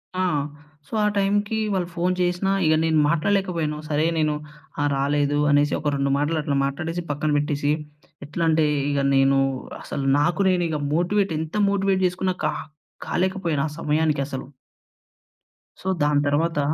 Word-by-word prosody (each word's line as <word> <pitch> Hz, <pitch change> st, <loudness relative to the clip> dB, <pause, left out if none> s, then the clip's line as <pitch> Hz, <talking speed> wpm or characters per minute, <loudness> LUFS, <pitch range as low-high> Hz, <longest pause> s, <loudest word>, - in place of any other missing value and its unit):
ఆ! 185 Hz, 0 st, +1 dB, 0.6 s
సో, -, -, -15 dB
ఆ -, -, +3 dB
టైమ్‌కి 205 Hz, +2 st, +1 dB, 0.2 s
వాళ్ళు 180 Hz, -2 st, 0 dB
ఫోన్ 180 Hz, +2 st, +1 dB
చేసినా 180 Hz, +2 st, +1 dB
ఇగ 155 Hz, -, +4 dB
నేను 160 Hz, -1 st, +3 dB
మాట్లాడలేకపోయాను. 170 Hz, -2 st, 0 dB
సరే, 150 Hz, +1 st, +1 dB
నేను 155 Hz, -1 st, +2 dB, 0.5 s
ఆ! -, -, +2 dB
రాలేదు 145 Hz, +1 st, +1 dB
అనేసి, 145 Hz, 0 st, +3 dB
ఒక 150 Hz, -1 st, -1 dB
రెండు 140 Hz, 0 st, 0 dB
మాటలు 150 Hz, +3 st, 0 dB
అట్లా 145 Hz, -1 st, -1 dB
మాట్టాడేసి, 165 Hz, +5 st, -3 dB
పక్కన 145 Hz, +1 st, -1 dB
పెట్టేసి, 145 Hz, 0 st, 0 dB, 0.5 s
ఎట్లంటే 160 Hz, +1 st, +1 dB, 0.2 s
ఇగ 145 Hz, -1 st, 0 dB, 0.2 s
నేనూ, 135 Hz, 0 st, +4 dB, 0.4 s
అసలు 140 Hz, -1 st, -4 dB
నాకు 170 Hz, +6 st, +1 dB
నేనిగ 170 Hz, -4 st, +1 dB, 0.2 s
మోటివేట్ 190 Hz, +2 st, +1 dB
ఎంత 160 Hz, +4 st, -5 dB
మోటివేట్ 195 Hz, -1 st, +1 dB
జేసుకున్న 185 Hz, +1 st, 0 dB
కా -, -, +1 dB, 0.5 s
కాలేకపోయినా 180 Hz, -5 st, 0 dB
ఆ 150 Hz, -, -10 dB
సమయానికసలు. 145 Hz, -4 st, -1 dB, 1.3 s
సో, -, -, -7 dB, 0.2 s
దాని 145 Hz, -1 st, +3 dB
తరవాత 150 Hz, +2 st, +1 dB
160 Hz, 140 wpm, -23 LUFS, 145-180 Hz, 1.3 s, ఇగ